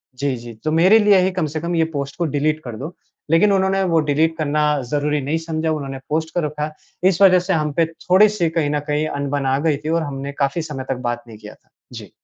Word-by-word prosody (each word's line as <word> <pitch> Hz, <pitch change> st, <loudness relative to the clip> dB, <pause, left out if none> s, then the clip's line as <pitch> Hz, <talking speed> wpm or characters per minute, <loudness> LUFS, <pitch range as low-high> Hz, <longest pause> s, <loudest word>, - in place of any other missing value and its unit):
जी, 140 Hz, 0 st, -1 dB
जी। 120 Hz, 0 st, -9 dB
"तो 155 Hz, -, 0 dB
मेरे 185 Hz, +7 st, +5 dB
लिए 205 Hz, -2 st, +5 dB
ही 190 Hz, -, 0 dB
कम 185 Hz, -3 st, -1 dB
से -, -, 0 dB
कम 170 Hz, +1 st, -2 dB
ये 165 Hz, -, +3 dB
पोस्ट 140 Hz, -1 st, -4 dB
को 175 Hz, -, 0 dB
डिलीट 155 Hz, +2 st, 0 dB
कर 120 Hz, -3 st, -7 dB
दो।" 155 Hz, +8 st, -7 dB, 0.4 s
लेकिन 175 Hz, +6 st, +4 dB
उन्होंने 195 Hz, 0 st, +1 dB
वो 170 Hz, -3 st, +2 dB
डिलीट 160 Hz, +3 st, +2 dB
करना 150 Hz, -1 st, 0 dB, 0.3 s
ज़रूरी 150 Hz, 0 st, 0 dB
नहीं 145 Hz, +4 st, -1 dB
समझा 160 Hz, 0 st, -1 dB
उन्होंने 140 Hz, -3 st, -4 dB
पोस्ट 160 Hz, +1 st, -2 dB
कर 175 Hz, -, +1 dB
रखा। 150 Hz, 0 st, -4 dB, 0.4 s
इस 190 Hz, -1 st, +1 dB
वज़ह 185 Hz, -2 st, +7 dB
से 185 Hz, +2 st, -1 dB
हम 150 Hz, -2 st, 0 dB
पे 165 Hz, +3 st, +2 dB
थोड़ी-सी 180 Hz, +3 st, +2 dB
कहीं 160 Hz, -3 st, 0 dB
न 150 Hz, 0 st, 0 dB
कहीं 150 Hz, +1 st, 0 dB
अनबन 140 Hz, -1 st, -2 dB
आ 135 Hz, 0 st, +2 dB
गयी 150 Hz, -3 st, +2 dB
थी -, -, -1 dB
और 165 Hz, 0 st, +1 dB
हमने 140 Hz, -1 st, -5 dB
काफ़ी 140 Hz, +4 st, 0 dB
समय 135 Hz, -2 st, -4 dB
तक 135 Hz, -, 0 dB
बात 120 Hz, 0 st, -4 dB
नहीं 110 Hz, -2 st, -11 dB
किया 105 Hz, 0 st, -11 dB
था। -, -, -36 dB, 0.2 s
जीI -, -, -9 dB
155 Hz, 245 wpm, -20 LUFS, 140-170 Hz, 0.4 s, वज़ह